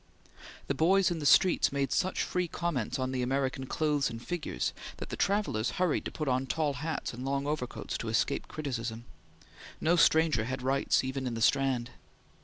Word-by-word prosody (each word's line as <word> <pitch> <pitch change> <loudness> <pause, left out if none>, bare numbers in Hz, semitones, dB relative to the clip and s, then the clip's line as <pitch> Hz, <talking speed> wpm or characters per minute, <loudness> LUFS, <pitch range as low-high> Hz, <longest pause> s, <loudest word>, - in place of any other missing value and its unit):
The - - -1
boys 185 +5 +3
in 170 - -2
the 145 - 0
streets 185 +4 +5
made 140 -2 -1
such 185 0 +1
free 180 -1 -1
comments 165 -9 -2
on 130 0 -2
the 130 -1 -1
American 130 +1 -1
clothes 150 -2 +1
and 115 - -6
figures, 145 - -3 0.2
that - - -7
the - - -4
travellers 195 - 0
hurried 180 -4 +1
to - - -3
put 155 - -4
on 130 +1 +1
tall 150 0 0
hats 160 -4 -3
and 125 +2 -7
long 140 +1 -1
overcoats 145 -4 -3
to 115 - -4
escape 115 +5 0
criticism. 120 -6 -4 0.7
No 165 +2 +3
stranger 160 -8 +4
had 130 +1 -4
rights 135 +1 +2
even 130 0 -3
in 120 - -3
the - - -3
Strand. 130 -3 +2
140 Hz, 185 wpm, -30 LUFS, 125-160 Hz, 0.7 s, streets